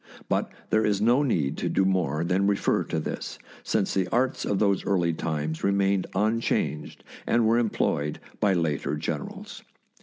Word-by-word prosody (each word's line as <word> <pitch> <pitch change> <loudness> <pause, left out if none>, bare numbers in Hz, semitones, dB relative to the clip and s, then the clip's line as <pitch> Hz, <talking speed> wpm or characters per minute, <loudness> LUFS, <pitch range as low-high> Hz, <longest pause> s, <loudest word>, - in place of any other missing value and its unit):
But - - 0 0.2
there 110 - +3
is 105 -2 +1
no 120 +6 +4
need 80 - 0
to - - -1
do 95 - +2
more 85 -5 +1
than 95 +3 +1
refer 100 -1 +1
to - - -2
this, - - -5 0.2
since 105 -3 0
the 95 -2 +1
arts 125 +6 0
of 100 - 0
those 100 -1 +2
early 85 -4 +1
times 80 -1 -3
remained 100 -1 +2
unchanged 105 -8 -1 0.2
and 115 0 +3
were 115 +2 +4
employed 75 -9 0 0.2
by 100 -2 +3
later 75 -4 0
generals. 75 -1 -5
95 Hz, 160 wpm, -26 LUFS, 80-105 Hz, 0.2 s, no